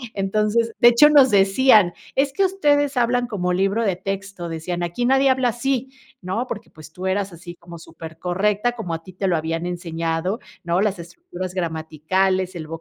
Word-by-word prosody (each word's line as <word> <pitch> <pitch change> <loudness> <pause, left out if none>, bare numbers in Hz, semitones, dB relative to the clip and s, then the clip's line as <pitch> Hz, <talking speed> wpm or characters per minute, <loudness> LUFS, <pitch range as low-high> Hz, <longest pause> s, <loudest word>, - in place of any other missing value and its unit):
Entonces, 215 +4 0
de 240 - +7
hecho, 240 +6 +7
nos 275 -5 +6
decían: 200 -1 +4 0.2
"Es 275 +1 +2
que 390 +7 +1
ustedes 290 -7 +1
hablan 245 0 +1
como 180 -6 -2
libro 195 +5 +1
de 195 -5 0
texto", 195 -2 -5
decían: 170 +2 -4
"aquí 175 +8 -2
nadie 270 +2 +4
habla 260 -1 +2
así". 260 +2 -2 0.3
¿No? 205 +8 -3
Porque, 210 - -7
pues, 155 0 -14
tú 185 - -7
eras 195 0 -1
así 175 +1 -10
como 170 0 -11
super 160 0 -11
correcta, 205 +6 0
como 185 -8 -5
a 165 - -7
ti 185 - -13
te 190 +2 -2
lo 180 - +2
habían 165 +2 -3
enseñado, 170 +3 -3 0.2
¿no? 170 +1 0
Las 205 -2 0
estructuras 185 - -8
gramaticales, 180 +3 -1
el 155 -2 -6
195 Hz, 185 wpm, -21 LUFS, 175-240 Hz, 0.3 s, de